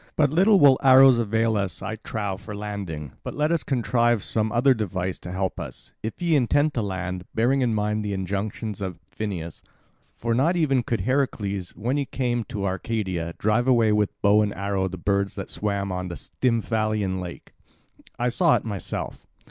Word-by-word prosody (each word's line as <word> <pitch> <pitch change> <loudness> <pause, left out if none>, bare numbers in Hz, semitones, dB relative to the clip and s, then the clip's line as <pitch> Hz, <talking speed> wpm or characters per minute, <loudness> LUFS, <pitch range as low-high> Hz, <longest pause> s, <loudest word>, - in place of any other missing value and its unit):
But 145 -3 +3
little 195 +5 +5
will 140 -4 +6
arrows 130 -2 +7
avail 115 0 +1
us, 95 -5 -2
I 110 - -4
trow, 105 -3 -3
for 100 +2 -8
landing. 100 -9 -5
But - - -6
let 150 +2 +1
us 170 -3 +2
contrive 120 -3 +1
some 110 -1 0
other 125 +3 +4
device 95 -5 -3
to 90 - -8
help 95 0 -2
us, - - -8
if 110 - -5
ye 170 -2 +2
intend 145 +3 +2
to 120 - -1
land, 90 -2 -3
bearing 125 +5 +2
in 120 -3 +1
mind 105 0 0
the 105 - -3
injunction 100 +3 -3
of 95 -3 -4
Phineus. 90 -7 -5 0.5
For 115 0 -1
not 145 +9 +2
even 140 -7 +2
could 115 -4 -2
Heracles, 100 -6 -1
when 125 +6 -1
he 140 - 0
came 120 -3 -1
to 100 -2 -4
Arcadia, 95 -3 -2
drive 110 +4 +1
away 115 -4 +4
with 105 -1 0
bow 105 +1 +5
and 105 -1 -1
arrow 100 -1 -1
the 95 0 -6
birds 100 +2 0
that 95 - -6
swam 100 -2 -2
on 90 0 -3
the 85 - -5
Stymphalian 110 -5 -1
lake. 90 -1 -9 0.6
I 120 +1 +1
saw 170 +7 +3
it - - -2
myself. 100 -4 -5
110 Hz, 185 wpm, -24 LUFS, 95-125 Hz, 0.6 s, arrows